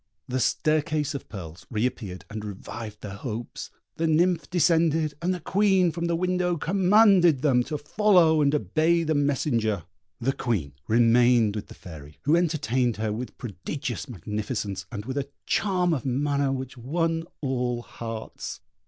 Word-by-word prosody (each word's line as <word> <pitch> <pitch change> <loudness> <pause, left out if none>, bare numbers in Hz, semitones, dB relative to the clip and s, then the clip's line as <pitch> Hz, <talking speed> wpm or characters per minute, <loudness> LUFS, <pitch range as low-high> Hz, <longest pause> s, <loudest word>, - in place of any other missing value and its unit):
The 130 +1 -1
staircase 155 +1 +1
of 140 - -7
pearls 90 -2 -9
re 110 0 0
appeared 100 -7 -4
and 105 0 -6
revived 105 +1 -7
their 100 - -6
hopes; 115 +1 -6 0.3
the 165 - +1
nymph 170 +3 +2
descended, 165 -3 +2
and 175 +2 +1
the 180 - -2
Queen 190 0 +3
from 170 +2 -3
the 170 0 +1
window 180 0 0
commanded 185 - +4
them 130 -5 +4
to 150 - -3
follow 165 -1 +4
and 145 0 +3
obey 155 - +2
the 160 -1 +1
messenger. 125 - +1 0.4
The 135 +3 0
Queen 100 - -2
remained 115 -1 +4
with 105 - -5
the - - -12
Fairy, 75 -4 -11
who 155 - +4
entertained 135 -9 +1
her 110 -1 -1
with 120 +3 -6
prodigious 130 - -5
magnificence, 105 -1 -4
and 105 -2 -5
with 135 +3 -2
a 140 - -4 0.2
charm 180 -4 +1
of 135 -7 -2
manner 140 +1 0
which 130 -1 -5
won 165 +5 -1
all 125 -3 -1
hearts. 115 -2 -7
140 Hz, 155 wpm, -26 LUFS, 115-165 Hz, 0.4 s, commanded